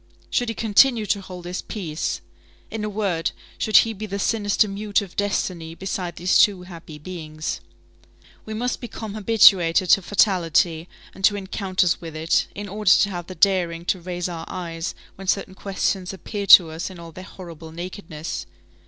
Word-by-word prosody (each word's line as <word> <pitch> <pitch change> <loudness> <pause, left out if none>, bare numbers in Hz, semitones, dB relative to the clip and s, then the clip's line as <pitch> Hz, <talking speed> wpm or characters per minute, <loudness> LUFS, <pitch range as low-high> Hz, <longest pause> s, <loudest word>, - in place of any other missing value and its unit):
Should 245 -1 +1
he 225 - -3
continue 225 +1 +4
to 200 0 0
hold 180 -2 -10
his 180 +1 -4
peace? 170 -8 -4 0.5
In 220 -1 -4
a 210 - -2
word, 195 -6 -1 0.3
should 215 - +4
he 225 - +4
be 215 +1 -6
the 200 0 -4
sinister 205 0 +1
mute 205 +1 0
of 190 - -12
destiny 180 -5 -2
beside 180 -2 -4
these 180 +3 +2
two 195 -4 +4
happy 170 -4 -10
beings? 155 -1 -6 0.8
We 215 - -6
must 245 +3 -1
have - - -29
become 225 -3 -7
habituated 190 -5 +5
to 195 - +6
fatality 175 -4 +2 0.2
and 195 - -13
to 205 - +4
encounters 190 -2 0
with 165 -2 -8
it, 160 +1 +1
in 205 0 -6
order 210 +2 -1
to 200 - +6
have 175 -2 -6
the 185 - -8
daring 175 -4 +2
to 185 0 0
raise 175 0 -3
our 165 -2 -6
eyes 165 -2 -5 0.2
when 195 0 -9
certain 195 0 0
questions 190 -1 -2
appear 200 +2 -5
to 175 -4 +9
us 160 +4 -4
in 185 - -11
all 170 -1 -10
their 185 +3 -10
horrible 170 -4 -11
nakedness. 170 -2 -6
185 Hz, 180 wpm, -23 LUFS, 170-205 Hz, 0.8 s, to